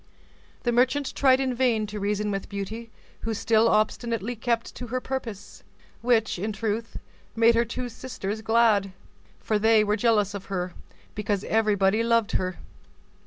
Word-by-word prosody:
The 240 - +1
merchant 260 +4 +2
in 260 -1 +4
vain 240 -3 +2
tried - - -9
to 210 - -5
reason 205 +1 -1
with 195 -1 -4
Beauty 210 +4 -5 0.3
who 225 0 -3
still 225 +1 +3
obstinately 230 +1 0
kept 230 +1 -1
to 245 - -7
her 255 +2 -2
purpose; 235 -6 -6 0.4
which, 225 -6 +2
in 210 +4 -2
truth, 220 +2 -3 0.4
made 230 +1 +5
her 235 +1 +2
two 245 +2 -4
sisters 225 -4 -5
glad, 220 -4 +3 0.5
for 215 -1 0
they 220 0 +5
were 210 0 +1
jealous 210 -2 +2
of 200 -1 -6
her, 180 -2 -3 0.4
because 205 -1 -2
everybody 210 -1 +2
loved 230 -1 +2
her. 185 -1 -1
220 Hz, 155 wpm, -26 LUFS, 205-235 Hz, 0.5 s, made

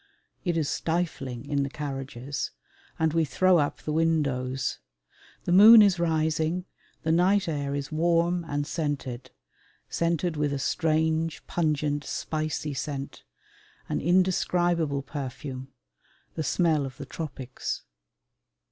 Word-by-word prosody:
It 175 -3 0
is 155 -3 +1
stifling 160 -9 -2
in 140 -1 0
the 140 - -1
carriages, 135 -2 -4 0.5
and 160 -1 +1
we 165 -1 +3
throw 180 +5 +3
up 145 -1 -1
the 155 - -2
windows. 140 -5 0 0.6
The - - -2
moon 215 +4 +10
is 190 -4 +3
rising, 160 +1 0 0.4
the 160 - +1
night 185 +4 +3
air 145 -3 -2
is 140 +1 -4
warm 170 +2 +2
and 145 0 -1
scented 145 -6 -3 0.6
scented 170 -1 0
with 145 -1 0
a - - -1
strange 160 +3 0
pungent, 150 -3 0
spicy 155 -1 -3
scent 140 0 -5 0.7
an - - -1
indescribable 175 -4 +2
perfume 135 -1 -6 0.6
the - - -3
smell 155 -2 +2
of 130 - -11
the 140 - -7
tropics. 135 -4 -5
155 Hz, 120 wpm, -27 LUFS, 140-170 Hz, 0.7 s, moon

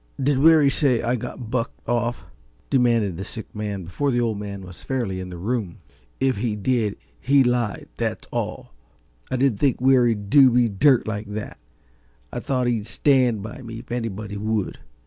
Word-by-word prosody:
"Did 135 0 +2
Weary 155 -2 +6
say 130 -5 +2
I 120 +1 +1
got 115 0 -6
bucked 125 -2 -3
off?" 120 -4 -1 0.5
demanded 115 -8 +2
the 95 - -4
sick 110 +2 -9
man 105 -3 -4
before 115 - -2
the 120 -2 +1
Old 115 -4 0
Man 100 -2 -6
was 90 -1 -11
fairly 115 -8 -2
in 90 0 -6
the 90 - -7
room. 105 -1 -2 0.4
"If 130 -3 +1
he 110 0 -1
did, 105 0 0 0.2
he 135 +1 +4
lied, 120 -4 -1
that's - - -3
all. - - -4 0.6
I - - -1
didn't 130 -5 +2
think 135 -4 +2
Weary'd 120 -5 +3
do 140 -3 +8
me 120 -1 +3
dirt 120 +6 +3
like 105 -1 -3
that 110 - -6 0.7
I - - -2
thought 130 -2 -1
he'd 115 -3 -1
stand 125 -5 +2
by 110 +4 -8
me 115 -2 -8
if 115 +1 -11
anybody 110 -4 -4
would. 105 -1 -2
115 Hz, 180 wpm, -23 LUFS, 105-130 Hz, 0.7 s, do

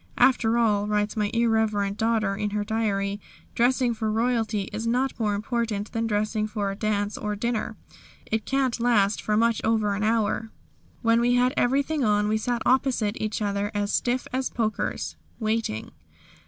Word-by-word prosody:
"After 235 -3 +4
all," 210 -3 +2
writes 210 0 0
my 210 -2 0
irreverent 220 -3 +1
daughter 220 -2 +1
in 210 +1 -2
her 205 0 -1
diary, 205 -2 -1 0.3
"dressing 245 0 +2
for 220 -1 -2
royalty 225 -2 0
is 220 +2 -3
not 250 +2 0
more 210 -2 +1
important 215 -1 -2
than 225 0 -1
dressing 215 0 0
for 205 -2 -2
a - - -5
dance 205 0 -1
or 210 0 -2
dinner. 235 +1 -2 0.5
It 220 -1 -1
can't 265 -1 0
last 215 -4 +2
for 210 0 0
much 230 0 +2
over 220 -2 +2
an 200 - -3
hour. 225 0 +1 0.5
When 230 0 +4
we 245 +1 +3
had 250 +1 +3
everything 280 +3 +1
on 210 -2 +2
we 215 - +2
sat 240 +1 -1
opposite 250 -5 +2
each 215 0 -2
other 200 0 -1
as 205 0 -1
stiff 245 +1 0
as 260 0 0
pokers 220 -2 -2 0.2
waiting." 220 - -2
220 Hz, 170 wpm, -25 LUFS, 210-235 Hz, 0.5 s, After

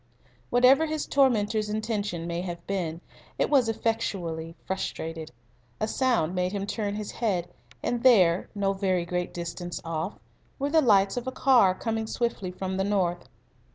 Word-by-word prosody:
Whatever 255 +6 +5
his 310 -1 -2
tormentor's 220 -6 +2
intention 210 -5 -2
may 170 0 -2
have 175 -2 -6
been, 175 -4 -3 0.4
it - - 0
was 265 -5 +4
very 225 - -1
effectually 170 -8 -2
frustrated. 165 -4 -4 0.5
A 215 - 0
sound 230 -10 +1
made 180 +1 -1
him 200 -1 -2
turn 205 -1 -2
his 210 -1 -5
head, 190 -7 -1 0.4
and 240 -1 -1
there, 190 -9 +5
no 195 -1 +1
very 190 -3 0
great 180 0 -2
distance 175 0 -5
off, 165 +4 -3 0.4
were 280 +1 -2
the 320 0 +5
lights 200 -5 +4
of 245 +1 -3
a - - -1
car 245 -9 +4
coming 225 +2 -2
swiftly 230 -5 -2
from 185 +1 -4
the 190 - +1
north. 175 -7 0
200 Hz, 160 wpm, -27 LUFS, 175-230 Hz, 0.5 s, Whatever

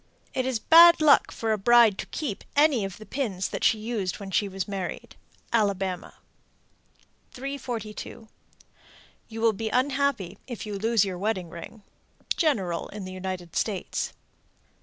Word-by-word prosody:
It 255 0 -1
is 260 -3 0
bad 335 +7 +8
luck 305 -2 +5
for 225 -1 -2
a 215 - 0
bride 235 -1 +5
to - - -4
keep 250 -11 -4
any 290 -6 +4
of 195 -2 -5
the 215 - -11
pins 200 -6 -2
that - - -5
she 225 0 +4
used 215 -4 -3
when 195 -1 -8
she 205 +2 +1
was 195 -1 -4
married. 195 -3 -5 0.4
Alabama. 195 -5 0 1.2
342. 245 -5 -6 1.0
You 225 0 -7
will 225 -1 +4
be 220 +2 -3
unhappy 255 -7 0
if 240 -4 -6
you 210 - -5
lose 225 -1 +2
your 185 -2 -5
wedding 190 -4 -2
ring. 210 +6 -10 0.5
_General 195 - 0
in 205 -2 -7
the 185 - -7
United 185 -2 -6
States. 200 -5 -2
215 Hz, 150 wpm, -26 LUFS, 190-245 Hz, 1.2 s, bad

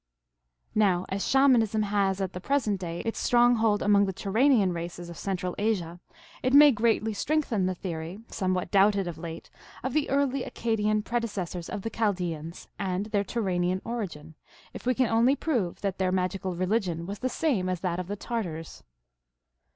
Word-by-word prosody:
Now 190 -4 +2
as 195 +1 -2
Shamanism 240 -6 +4
has 200 -2 +1
at 190 -1 -2
the 180 - -6
present 220 -6 0
day 170 -1 -4
its 225 - -3
stronghold 240 -3 +3
among 200 -1 +4
the 190 - -2
Turanian 210 0 +2
races 170 0 -6
of - - -9
Central 180 -2 -2
Asia, 180 -6 -1 0.4
it 255 +1 +2
may 295 0 +9
greatly 220 -1 +1
strengthen 230 -5 0
the 185 - -1
theory, 170 0 -5
somewhat 185 -3 -2
doubted 200 -1 +4
of 165 -2 -6
late, 165 -1 -8 0.3
of 260 0 -2
the 305 -1 +1
early 275 -1 +1
Accadian 215 -2 0
predecessors 205 -8 -3
of 200 - -5
the 225 - -3
Chal 220 -3 +1
deans 170 -3 -5
and 190 0 -1
their 205 -1 +2
Turanian 185 -4 -1
origin, 175 -10 -5 0.4
if - - -8
we 255 - +3
can 255 - +3
only 230 +4 +3
prove 240 - -1
that 195 -2 -2
their 185 -1 +1
magical 185 0 -1
religion 185 -2 -1
was 200 +3 -6
the 255 - -1
same 240 - 0
as 180 -2 -2
that 180 -2 -1
of 180 - -4
the 205 - -3
Tartars. 185 -8 -5
200 Hz, 175 wpm, -27 LUFS, 180-230 Hz, 0.4 s, may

